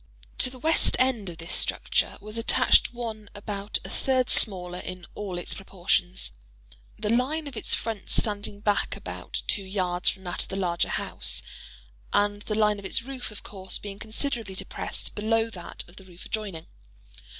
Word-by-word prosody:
To - - +5
the 255 - -10
west 320 +5 +4
end 240 -7 +2
of 170 - -8
this 165 +1 -5
structure - - +2
was 215 +1 -7
attached 230 0 +5
one 225 -4 -5
about 205 0 -2
a - - -5
third 255 -2 +2
smaller 180 -4 +3
in 180 -1 -6
all 195 -4 -4
its 175 - -4
proportions:—the - - -3
line 275 +7 +2
of 280 -3 -6
its 220 - +2
front 220 -3 -4
standing 205 -1 0
back 205 -1 +2
about - - -5
two 200 - +2
yards 185 -2 +1
from 190 - -6
that 175 -1 -2
of - - -4
the 190 - -4
larger 175 -3 +1
house, - - +1 0.7
and 205 0 +2
the 215 - -2
line 210 -1 +4
of 200 - -9
its 190 - +2
roof, 260 -1 -5
of 210 - -9
course, 190 -2 0
being 200 -1 -7
considerably 220 -2 -2
depressed - - -3
below 225 +2 +2
that 175 -5 -6
of 175 +3 -16
the 190 - -11
roof 180 -1 -12
adjoining. 200 -7 -3
205 Hz, 170 wpm, -27 LUFS, 185-225 Hz, 0.7 s, To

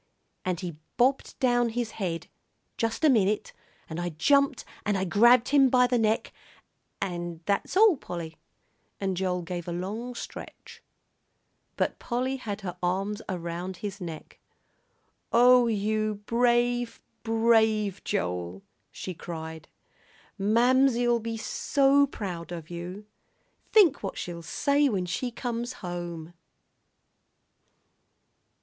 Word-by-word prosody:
and 180 -2 -2
he 175 -4 -5 0.2
bobbed 260 +3 +2
down 245 -2 +2
his 230 -1 -2
head, 175 -6 -3 0.5
just 230 +6 -2
a - - +7
minute, 210 -5 +2 0.3
and 160 +1 -5
I 175 0 -2
jumped 280 - +2 0.2
and 205 -2 +1
I 190 - 0
grabbed 235 +6 +5
him 275 -2 +5
by 250 0 +5
the 245 -1 +1
neck, 220 0 0 0.7
and 175 -3 -4
that's 200 - 0
all, 415 -6 +6
Polly." 165 -7 -7 0.6
And 195 -1 -1
Joel 180 -1 -1
gave 175 0 -5
a - - -3
long 210 +8 -4
stretch. - - -9 1.0
But - - -1
Polly 255 +2 -2
had 215 -4 -5
her 180 -2 -5
arms 195 +4 -1
around 175 0 -4
his 200 +1 -6
neck. 165 -3 -8 0.9
"Oh, 245 +1 +6
you 215 0 0
brave, 240 0 +1 0.2
brave 225 -3 +2
Joel," 90 +1 -3 0.3
she 185 - -6
cried. 160 -1 -7 0.7
"Mamsie'll 240 +3 +3
be 225 0 -4
so 280 +4 +3
proud 180 -9 -6
of 165 -1 -7
you! 180 +4 -7 0.7
Think 365 -10 +5
what 195 - -5
she'll 170 -1 -5
say 285 - +2
when 190 -6 -1
she 215 +8 -2
comes 240 0 -4
home!" 175 -2 -5
210 Hz, 120 wpm, -27 LUFS, 175-245 Hz, 1.0 s, a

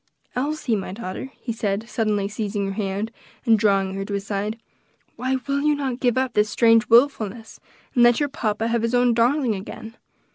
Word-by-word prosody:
"Elsie, 275 -2 -1
my 195 -2 -4
daughter," 200 +4 -6
he 235 - -4
said, 215 0 -2
suddenly 215 -3 0
seizing 205 -1 -3
her 195 - -3
hand, 200 +2 -3 0.3
and 225 -3 +5
drawing 195 -2 +2
her 195 0 -3
to 200 0 -4
his 200 0 -4
side, 205 +2 -2 0.6
"why 260 +1 -1
will 280 0 0
you 300 0 +3
not 265 -3 -3
give 245 -2 +1
up 260 -1 0
this 210 0 +2
strange 225 +3 +4
wilfulness, 230 -3 +2 0.3
and 245 - +3
let 240 0 +6
your 290 - +1
papa 220 -4 -1
have 235 -1 +1
his 230 +2 0
own 245 -1 +4
darling 245 +1 +2
again? 215 +3 -8
225 Hz, 190 wpm, -23 LUFS, 205-245 Hz, 0.6 s, let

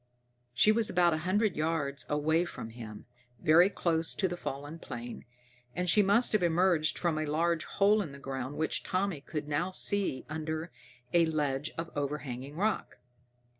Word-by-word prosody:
She 210 - +5
was 220 0 +4
about 175 -2 +3
a - - 0
hundred 205 -1 +2
yards 150 -3 -2
away 155 +3 +2
from 115 -9 -7
him, 110 -3 -9 0.3
very 170 +4 +6
close 165 -4 0
to 190 - +1
the 175 - -4
fallen 145 0 -6
plane, 120 -4 -7 0.5
and 180 0 -1
she 210 +5 +5
must 205 +5 +4
have 215 - +2
emerged 170 -2 +2
from 165 -3 0
a 155 - -2
large 165 +2 0
hole 205 +2 +3
in 165 -8 -5
the 140 - -10
ground 135 0 -5
which 160 - -1
Tommy 185 -5 -1
could 150 0 -5
now 150 +5 0
see 190 -6 0
under 155 +2 -4 0.4
a 170 -1 +5
ledge 150 -2 -1
of 165 0 -4
overhanging 140 -2 -4
rock. 210 +6 -1
160 Hz, 170 wpm, -30 LUFS, 145-180 Hz, 0.5 s, very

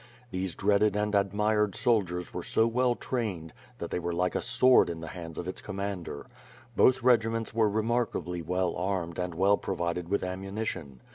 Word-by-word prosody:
These 95 -2 -2
dreaded 105 +1 +2
and 105 0 0
ad 100 -1 +2
mired 105 -1 +1
soldiers 90 -8 0
were - - -3
so 110 - +2
well 120 +1 +2
trained 100 -13 -3 0.3
tLat - - -5
they - - -1
were 85 0 -3
like 90 +1 +1
a - - -1
sword 125 +2 +5
in 85 -1 -4
the 80 -1 -7
hands 85 -2 -8
of 90 - -4
its 95 - -5
commander. 100 -6 -5 0.5
Both 130 -1 +4
regiments 115 -2 +2
were 110 -1 +3
remarkably 105 -6 -1
well 90 +2 0
armed 90 -2 -2
and 90 -2 -3
well 100 +4 +4
provided 85 -2 -3
with 100 - 0
ammunition. 95 - -4
100 Hz, 180 wpm, -29 LUFS, 90-110 Hz, 0.5 s, sword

